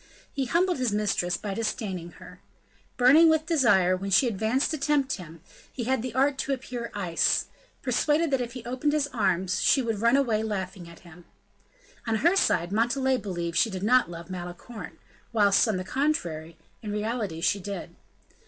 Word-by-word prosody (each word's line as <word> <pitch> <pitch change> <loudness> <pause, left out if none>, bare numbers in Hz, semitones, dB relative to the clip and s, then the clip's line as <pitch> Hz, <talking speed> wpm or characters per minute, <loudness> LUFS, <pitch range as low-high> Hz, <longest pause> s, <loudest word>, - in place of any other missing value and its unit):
He 275 -1 -1
humbled 350 +4 +1
his 250 -4 0
mistress 195 -4 0
by 200 +2 -5
disdaining 195 -5 -4
her. - - -14 0.6
Burning 285 +7 +6
with 315 -1 +2
desire, 205 - +3
when 195 +2 -5
she 205 +7 +4
advanced 225 +6 0
to 310 - -3
tempt 280 -1 +1
him, 165 -3 -11 0.3
he 245 - -5
had 260 0 0
the 245 -1 -6
art 270 +1 +2
to 275 - -1
appear 245 -2 -5
ice, 175 -5 +1 0.4
persuaded 295 +5 +1
that 270 -2 +1
if 240 -1 -5
he 250 -3 -9
opened 255 +5 -1
his 300 -2 +2
arms, 185 -6 0
she - - +4
would 225 -5 -2
run 235 +3 +4
away 235 -6 +1
laughing 190 -4 -4
at 170 - -15
him. 175 0 -15 0.8
On 225 - +1
her 340 - +3
side, 175 - +2
Montalais 255 +5 +1
believed 175 -6 -4
she 225 - +3
did 190 -2 -5
not 250 -1 +4
love 170 +1 -9
Malicorne; 180 +6 -8 0.4
whilst, 205 0 +4
on 215 -4 0
the 185 - -3
contrary, 175 - -2 0.2
in 210 - -5
reality 210 -5 -3
she 200 +4 +1
did. 180 -3 -7
220 Hz, 180 wpm, -26 LUFS, 185-265 Hz, 0.8 s, Burning